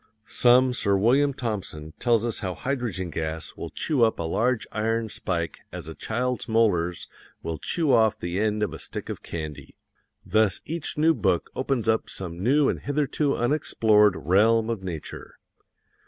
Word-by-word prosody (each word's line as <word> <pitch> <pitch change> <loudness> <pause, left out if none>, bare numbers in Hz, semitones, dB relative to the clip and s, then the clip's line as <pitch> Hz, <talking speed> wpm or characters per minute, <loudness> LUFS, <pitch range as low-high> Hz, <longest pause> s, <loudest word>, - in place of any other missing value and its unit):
Some 125 +1 +4
Sir 100 -5 +1
William 135 +8 +3
Thomson 95 - -5
tells 120 -2 +2
us 115 - -2
how 95 -2 -3
hydrogen 115 -10 -3
gas 80 0 -4
will - - -6
chew 145 -6 -1
up 115 -1 +4
a - - -3
large 115 +8 0
iron 115 +1 -1
spike 85 -5 -3
as - - -7
a 80 - -6
child's 125 +7 -2
molars 90 -7 +1 0.4
will 80 -2 -4
chew 160 -6 0
off 110 -2 +4
the 85 +2 -3
end 105 0 +1
of 105 - -2
a - - -7
stick - - -7
of - - -5
candy. 75 -4 -7 0.5
Thus 110 -4 +2
each 165 -1 -3
new 160 +2 +4
book 95 - 0
opens 130 -3 -1
up 110 0 +1
some 90 -2 -6
new 140 +6 +3
and - - 0
hitherto 145 0 0
unexplored 110 -6 +3
realm 110 +5 +3
of 110 -4 -3
nature. 85 -5 -7
110 Hz, 165 wpm, -25 LUFS, 90-125 Hz, 0.5 s, Some